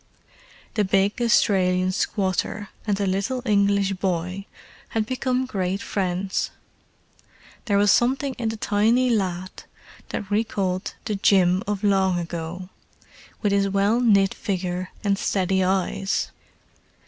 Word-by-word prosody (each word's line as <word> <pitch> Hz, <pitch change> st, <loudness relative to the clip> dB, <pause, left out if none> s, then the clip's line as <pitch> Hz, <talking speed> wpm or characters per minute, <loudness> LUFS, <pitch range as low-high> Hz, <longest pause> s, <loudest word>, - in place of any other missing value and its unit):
The 215 Hz, -, +1 dB
big 195 Hz, +4 st, +1 dB
Australian 185 Hz, -5 st, +3 dB
squatter 195 Hz, +1 st, -1 dB, 0.2 s
and 205 Hz, -2 st, +1 dB
the 200 Hz, -, 0 dB
little 200 Hz, +7 st, -1 dB
English 200 Hz, -2 st, +2 dB
boy 185 Hz, +1 st, -2 dB, 0.4 s
had 220 Hz, -1 st, -1 dB
become 255 Hz, +1 st, -1 dB
great 195 Hz, -5 st, -2 dB
friends: 190 Hz, -1 st, -2 dB, 1.2 s
there 205 Hz, -4 st, +2 dB
was 205 Hz, -1 st, +5 dB
something 265 Hz, +5 st, +2 dB
in 230 Hz, -2 st, 0 dB
the 220 Hz, -, -4 dB
tiny 225 Hz, +5 st, +2 dB
lad 185 Hz, -4 st, -2 dB, 0.4 s
that 205 Hz, -1 st, -5 dB
recalled 200 Hz, -3 st, -1 dB
the 215 Hz, -, -1 dB
Jim 190 Hz, -2 st, +3 dB
of 205 Hz, 0 st, -2 dB
long 190 Hz, -3 st, +3 dB
ago, 175 Hz, +1 st, -5 dB, 0.7 s
with 205 Hz, -, +2 dB
his 200 Hz, 0 st, +2 dB
well 200 Hz, +4 st, +2 dB
knit 200 Hz, -5 st, +4 dB
figure 185 Hz, -2 st, -3 dB
and 200 Hz, -1 st, +1 dB
steady 190 Hz, -1 st, +1 dB
eyes. 190 Hz, +1 st, 0 dB
195 Hz, 125 wpm, -24 LUFS, 185-210 Hz, 1.2 s, was